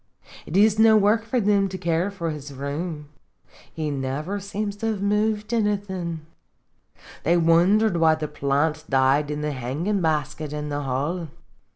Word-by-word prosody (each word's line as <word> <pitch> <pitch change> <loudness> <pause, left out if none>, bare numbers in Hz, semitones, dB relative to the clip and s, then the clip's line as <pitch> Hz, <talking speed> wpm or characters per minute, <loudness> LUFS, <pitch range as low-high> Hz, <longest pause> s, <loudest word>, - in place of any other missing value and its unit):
It 175 - -1
is 215 +1 +4
no 220 -1 +7
work 210 +2 +3
for 245 +2 0
thim 200 -2 +2
to 190 - -5
care 170 +1 0
for 170 -5 -4
his 145 -1 -7
room; 145 +3 -5 0.6
he 155 -2 -3
niver 140 +8 -3
seems 200 +1 -4
to 225 - -3
have 215 -3 -1
moved 210 +2 0
anythin'. 190 -7 -2 1.0
They 170 +4 +2
wondered 175 +5 +4
why 160 -1 +4
the 155 -1 -4
piant 150 +3 -1
died 135 +2 +3
in 150 0 -3
tne 150 - -1
hangin' 145 - -2
basket 155 -1 -1
in 150 0 -4
the 145 0 -2
hall. 145 +6 -2
165 Hz, 160 wpm, -24 LUFS, 150-205 Hz, 1.0 s, no